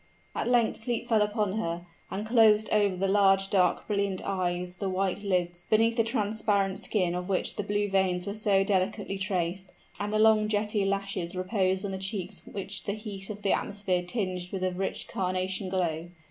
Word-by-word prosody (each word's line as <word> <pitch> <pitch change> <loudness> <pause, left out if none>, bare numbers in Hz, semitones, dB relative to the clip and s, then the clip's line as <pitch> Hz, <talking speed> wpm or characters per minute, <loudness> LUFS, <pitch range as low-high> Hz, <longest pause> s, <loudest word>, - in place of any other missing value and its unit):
At - - -2
length 240 -2 +3
sleep 235 +1 -2
fell 220 -3 +3
upon 210 -1 0
her, 170 -3 -3 0.2
and 200 +3 -4
closed 220 -2 +5
over 205 -3 +3
the 195 +2 0
large, 195 -1 +4
dark, 180 -3 +2
brilliant 200 -2 0
eyes 180 -1 -2
the 195 0 -2
white 190 +1 -1
lids, 175 -3 -1
beneath 225 +1 +4
the 230 - +3
transparent 210 -4 0
skin 180 -5 0
of 180 +1 -4
which 190 - -1
the - - -1
blue 205 0 0
veins 190 -2 +1
were 200 - -3
so 205 -2 +2
delicately 195 0 -1
traced; 185 0 -2 0.3
and 205 0 -2
the 215 - +1
long, 215 0 +5
jetty 210 -1 0
lashes 195 -3 -2
reposed 185 0 0
on 200 - -3
the 190 - -4
cheeks 190 -1 -4
which 195 0 -5
the 200 - -1
heat 205 -3 -6
of 210 -1 -7
the 195 - +3
atmosphere 195 -3 -1
tinged 180 -2 -3
with 190 -2 -3
a 185 - +1
rich 190 +2 -3
carnation 185 +1 -2
glow. 170 -3 -1
195 Hz, 190 wpm, -28 LUFS, 185-210 Hz, 0.3 s, closed